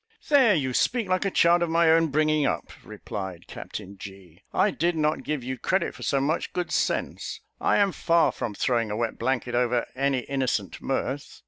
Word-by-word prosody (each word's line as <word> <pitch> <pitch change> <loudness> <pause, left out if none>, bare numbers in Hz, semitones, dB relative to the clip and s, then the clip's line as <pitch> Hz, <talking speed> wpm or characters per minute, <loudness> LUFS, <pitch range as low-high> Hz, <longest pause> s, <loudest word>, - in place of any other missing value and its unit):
"There 260 -8 +6
you 130 -5 -1
speak 235 - +1
like 185 +1 0
a - - +2
child 175 -1 +4
of 170 - +1
my 165 0 +4
own 165 0 +4
bringing 155 +1 +2
up," - - -1
replied 95 -4 -7
Captain 100 -1 -8
G: 95 -3 -12
"I 205 - +2
did 170 0 0
not 155 0 0
give 150 -4 -3
you 130 0 -5
credit - - 0
for - - -13
so 140 - +1
much 150 +4 -1
good 180 -1 -3
sense. - - -1 0.2
I - - +2
am 200 -1 +3
far 170 -1 +2
from 105 - -5
throwing 115 -2 0
a 105 - -3
wet 115 -1 -2
blanket 125 -2 -1
over 120 0 +1
any 135 -1 +1
innocent 130 -7 -2
mirth. 135 +1 -3
140 Hz, 195 wpm, -26 LUFS, 120-170 Hz, 0.2 s, There